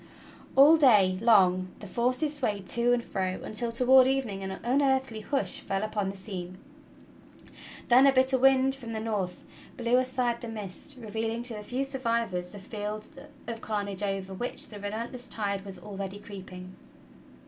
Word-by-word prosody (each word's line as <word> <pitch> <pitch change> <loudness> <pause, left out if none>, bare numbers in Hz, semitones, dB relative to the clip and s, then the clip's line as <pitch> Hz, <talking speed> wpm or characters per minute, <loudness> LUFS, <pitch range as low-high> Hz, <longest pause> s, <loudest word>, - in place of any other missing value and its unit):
All 290 +4 +8
day 205 -10 +5
long 185 -5 +4
the - - -9
forces 250 +9 0
swayed 210 -8 -2
to 235 0 +2
and 245 -1 +2
fro, 185 -3 -3
until 230 +2 -2
toward 255 +2 +6
evening 255 -8 -1
an 190 - -4
unearthly 265 -2 +1
hush 210 -6 -1
fell 195 +1 -2
upon 210 -2 -2
the 195 - -6
scene. 185 -2 -5 1.3
Then^a 265 +3 +6
bitter 260 0 +3
wind 265 0 +4
from 240 -4 -7
the 220 - -3
north 205 -5 -3 0.3
blew 240 0 +2
aside 255 -2 0
the 235 - -6
mist, 220 +5 -8
revealing 225 +1 -3
to 240 -1 0
the 210 -1 -7
few 250 +5 -2
survivors 230 -9 -1
the 205 - -11
field 210 +1 -6 0.4
of 230 -1 -6
carnage 200 -2 -3
over 195 -1 -3
which 240 +6 -4
the 210 - -9
relentless 230 +5 -5
tide 200 -3 -2
was 195 -2 -7
already 195 0 -6
creeping. 185 -2 -10
220 Hz, 160 wpm, -28 LUFS, 195-250 Hz, 1.3 s, All